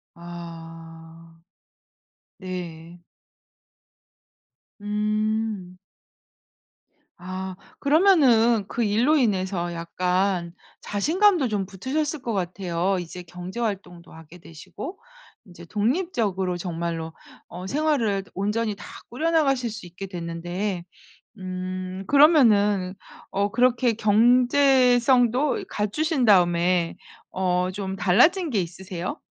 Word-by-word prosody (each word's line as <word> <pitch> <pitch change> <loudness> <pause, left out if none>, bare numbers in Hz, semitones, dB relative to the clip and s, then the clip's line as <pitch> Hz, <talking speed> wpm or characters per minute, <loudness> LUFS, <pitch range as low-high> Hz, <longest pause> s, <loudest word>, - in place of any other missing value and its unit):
아. 165 -1 -11 1.0
네. 175 -2 -7 1.8
음. 210 -2 -2 1.4
아 185 +1 -6 0.2
그러면은 270 - +4
그 240 - -2
일로 230 +9 +3
인해서 190 -7 0
약간 180 +1 -1 0.3
자신감도 330 - +2
좀 205 -4 -2
붙으셨을 280 - -3
것 235 -3 -3
같아요. 185 0 -1
이제 175 +1 -7
경제 180 +5 -8
활동도 185 -6 -4
하게 160 +2 -14
되시고 175 - -9 0.5
인제 175 -2 -13
독립적으로 210 - -1
정말로 165 -2 -4 0.3
어 180 +2 -8
생활을 255 -8 0
드 - - -23
온전히 210 +2 -1
다 - - -11 0.2
꾸려나가실 275 -3 +1
수 215 -2 -8
있게 180 +3 -8
됐는데 175 +2 -4 0.6
음 185 0 -5
그러면은 210 - +4 0.4
어 200 +1 0
그렇게 245 +1 +2
경제성도 245 +3 +4
이 - - -6
갖추신 265 - -1
다음에 175 -3 +3 0.3
어 180 -1 0
좀 190 0 -4
달라진 310 - +3
게 215 -6 +1
있으세요? 180 - -5
195 Hz, 205 characters per minute, -24 LUFS, 180-240 Hz, 1.8 s, 그러면은